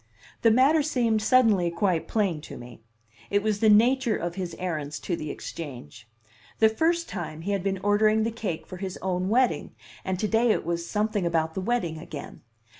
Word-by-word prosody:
The 230 - +5
matter 270 +7 +4
seemed 240 -7 +1
suddenly 215 -7 +4
quite 170 -1 0
plain 195 -8 0
to - - -8
me: 120 -1 -12 0.5
it 205 0 +1
was 215 -2 0
the 220 - +4
nature 235 +2 +4
of 175 0 -3
his 180 -2 -5
errands 150 -5 -4
to 175 - -2
the 155 -2 -6
Exchange. 120 - -8 0.5
The 220 - +5
first 335 +9 +1
time 160 -4 -6
he 195 +5 -3
had 200 -2 0
been 195 +1 -1
ordering 215 +1 +3
the 230 - -1
cake 210 -8 -4
for 185 - -9
his 190 0 -5
own 185 0 -1
wedding, 250 +3 +1 0.3
and 190 -1 -2
to 215 - -1
day 225 +2 +2
it - - +1
was 170 0 -3
something 210 -2 0
about 160 -1 0
the 190 - -3
wedding 185 -7 -1
again. 150 -3 -9
200 Hz, 190 wpm, -26 LUFS, 170-220 Hz, 0.5 s, The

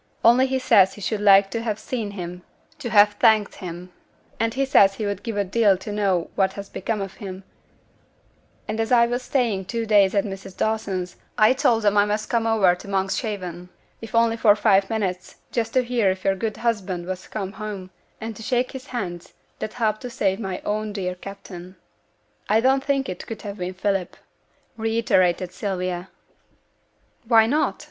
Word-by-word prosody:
Only 245 +3 +6
he 265 0 0
says 215 -7 +4
he 205 - -11
should 205 +2 -2
like 195 -1 +6
to 230 - -2
have 220 -3 -2
seen 225 -2 -4
him 180 -3 -7 0.4
to 255 -5 -4
have 205 -1 +6
thanked 220 -3 +3
him; 180 0 -8 0.5
and 230 0 +1
he 275 +3 0
says 195 -7 +5
he 215 - -3
would 200 -1 -3
give 230 -4 -4
a 205 - +2
deal 200 0 +3
to 200 +3 -7
know 195 -4 0
what 190 -1 +1
has 200 0 -8
become 215 +1 -3
of 195 -1 -5
him; 190 -1 -7 1.2
and 220 - -3
as 225 +1 -1
I 235 -1 +6
was 245 +1 -2
staying 230 -8 0
two 230 +3 -3
days 205 -2 +4
at 200 - +3
Mrs. 195 -1 -8
Dawson's, 195 -5 -2 0.2
I 215 +3 +6
told 255 -5 +2
them 205 0 +3
I 205 - +5
must 210 +1 -2
come 230 -1 +1
over 210 -5 +4
to 180 - -10
Monkshaven, 190 -2 -3 0.3
if 225 0 -7
only 230 0 +3
for 210 -3 +5
five 200 -2 +3
minutes, 190 -5 -3 0.2
just 225 -2 -2
to 255 - +4
hear 235 -5 +1
if 185 0 -3
your 195 - +3
good 215 +2 -3
husband 195 -7 -2
was 185 0 -6
come 195 -3 -4
home, 205 -3 -7 0.3
and 225 0 -6
to 225 - -10
shake 250 +2 0
his 265 +1 -9
hands, 180 -10 -5 0.3
that 215 - -4
helped 215 -3 -1
to 250 - -6
save 195 -4 0
my 190 -4 -4
own 215 0 -2
dear 185 -3 -2
captain.' 185 -1 -10 0.7
'I 215 +2 +4
don't 265 +2 +3
think 275 -1 0
it 185 - -6
could 225 -2 -7
have 205 -1 -7
been 180 +1 -4
Philip,' 195 -1 -1 0.6
reiterated 190 -6 +1
Sylvia. 185 -2 -3 1.2
'Why 225 -2 +6
not?' 290 +7 0
205 Hz, 190 wpm, -23 LUFS, 190-230 Hz, 1.2 s, Only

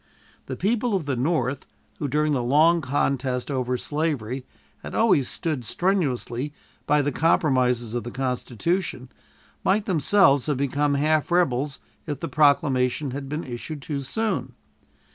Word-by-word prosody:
The - - -4
people 230 +1 0
of 180 -6 -1
the 140 -2 -1
North, 130 -1 -1 0.3
who 145 - -1
during 150 +2 +1
the 130 - +1
long 155 +7 +4
contest 135 -1 -1
over 125 -2 -1
slavery 135 -4 -3 0.3
had - - -8
always 185 - +3
stood 155 -7 -3
strenuously 145 - -1 0.3
by 150 0 +3
the 145 - 0
compromises 125 -6 +2
of 120 - -2
the 120 - -5
Constitution, 130 - -2 0.5
might 205 +2 +2
themselves 160 - +4
have 145 -3 0
become 140 +1 +1
half 155 +3 +1
rebels 145 -6 +1 0.3
if 145 -3 -3
this - - -5
proclamation 140 -2 +2
had 135 +1 -6
been 150 +3 -3
issued 135 +4 -7
too 145 -1 -3
soon. 135 - -2
140 Hz, 145 wpm, -24 LUFS, 130-160 Hz, 0.5 s, long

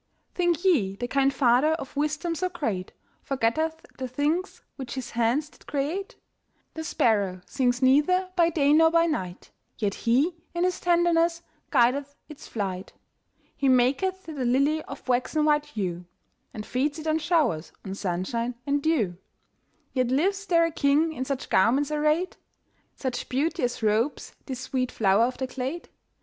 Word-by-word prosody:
Think 350 -1 0
ye 220 - +3
the 245 +4 -4
kind 275 +1 +2
Father 265 +3 +3
of 300 -4 -6
wisdom 305 +4 -1
so 365 +3 -1
great 225 - -3 0.3
Forgetteth 280 +6 -1
the 260 - -3
things 295 +9 -2
which 260 -3 -6
His 260 -2 -5
hands 240 +6 +1
did - - -22
create? 305 +8 -3 0.6
The 320 - -5
sparrow 200 -10 +1
sings 250 -1 0
neither 365 +8 +3
by 340 -2 +4
day 295 -3 +3
nor 320 +1 +6
by 335 0 +3
night, 185 - -4 0.3
Yet 205 -3 -1
He, 260 - +1 0.2
in 345 - +1
His 365 0 0
tenderness, 340 -1 +2 0.3
guideth 275 +4 +2
its 300 -2 -11
flight. 190 -4 -4 0.6
He 275 - +1
maketh 270 +10 +2
the 320 - -8
lily 275 +6 +2
of - - -10
waxen 255 +5 +1
white 295 -1 +3
hue, 180 -10 -4 0.5
And 210 - -7
feeds 285 +4 -1
it 310 - -8
on 315 0 +1
showers, 295 - +1
on 190 - -4
sunshine 200 +6 -2
and 285 0 +1
dew; 235 - +1 0.8
Yet 255 -2 +1
lives 390 +10 0
there 335 -2 +4
a 330 - -2
king 305 +2 +2
in 260 -3 -4
such 270 -1 -3
garments 270 +9 +3
arrayed? 305 +4 +1 0.6
Such 255 -3 -4
beauty 315 +7 0
as 245 -1 -2
robes 220 +6 0
this 260 -2 -5
sweet 255 -1 -2
flower 205 +1 +3
of 250 +1 -3
the 260 - -2
glade? 260 +6 -5
280 Hz, 160 wpm, -26 LUFS, 245-320 Hz, 0.8 s, nor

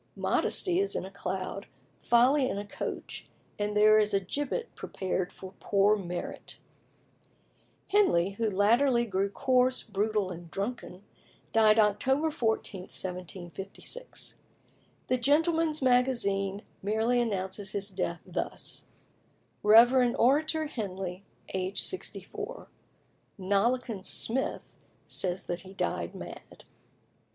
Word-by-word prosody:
Modesty 360 -1 +1
is 400 0 +1
in - - -2
a 190 - -9
cloud, 195 0 -4 0.3
Folly 255 +3 +4
in - - -3
a 205 - -4
coach, 200 - -6 0.3
and 210 0 -1
there 215 +1 +7
is 210 -1 +2
a - - +4
gibbet 290 - -3
prepared 185 -1 -3
for 190 0 -11
poor 200 +1 +3
Merit. 180 -3 -6 1.3
Henley, 200 - +3
who 220 +2 -1
latterly 235 +5 +3
grew 195 -2 0
coarse, 255 +2 +2
brutal, 210 -2 -1
and 170 -1 -9
drunken, 195 -1 -5 0.5
died 220 -1 +5
October 265 +9 +2
14, 220 - -1
1756. 185 - -5 0.7
The 255 - +1
Gentleman's 310 +3 +2
Magazine 215 -6 +2 0.2
merely 220 +4 +1
announces 195 -2 -2
his 200 0 -3
death 175 -2 -3
thus: - - -4 0.8
"Rev. 240 +3 +6
Orator 310 +5 +3
Henley, 190 -8 -5 0.3
aged 190 0 -1
64." 425 +5 -5 0.7
"Nollekens" 200 +2 0
Smith 265 +4 -1 0.3
says 180 -1 +1
that 175 0 -4
he 190 +1 -13
died - - -2
mad. - - -10
210 Hz, 110 wpm, -29 LUFS, 195-255 Hz, 1.3 s, there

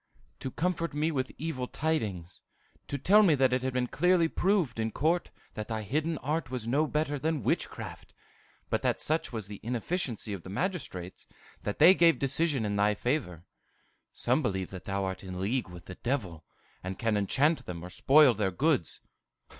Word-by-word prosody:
"To 130 - -4
comfort 170 +1 -2
me 155 +2 +1
with 130 -3 -2
evil 135 -5 -3
tidings; 105 - -2 0.5
to 140 - -3
tell 200 +10 +5
me 175 -8 +5
that 130 -2 +3
it 125 - +1
had 130 0 -1
been 125 -1 0
clearly 175 +6 +3
proved 175 - +1
in 110 0 0
court 160 +10 0 0.2
that 110 -1 -5
thy 110 -2 -3
hidden 155 - -1
art 150 -1 -1
was 125 -3 -4
no 145 +6 +2
better 150 -1 -1
than 155 -3 -1
witchcraft, - - -3 0.6
but - - +1
that - - 0
such 160 +2 0
was 110 -4 -4
the 100 0 -9
inefficiency 120 - -2
of 95 - -5
the 95 - -10
magistrates 100 - -4 0.3
that 105 - -3
they 165 +5 +8
gave 170 -3 +5
decision 140 -2 0
in 100 -1 -1
thy 105 +1 +3
favor. 105 - -2 0.7
Some - - +1
believe 95 -2 -2
that 95 -2 -8
thou 100 0 -1
art 95 +1 -4
in 95 -1 -6
league 110 +3 -1
with 90 0 -11
the 90 - -8
devil, 95 - -3 0.4
and 95 +1 -5
can 115 -2 0
enchant 140 - +1
them 85 -1 -6
or 90 - -9
spoil 140 +2 +6
their 100 -2 0
goods." 135 - 0
130 Hz, 185 wpm, -29 LUFS, 100-155 Hz, 0.7 s, they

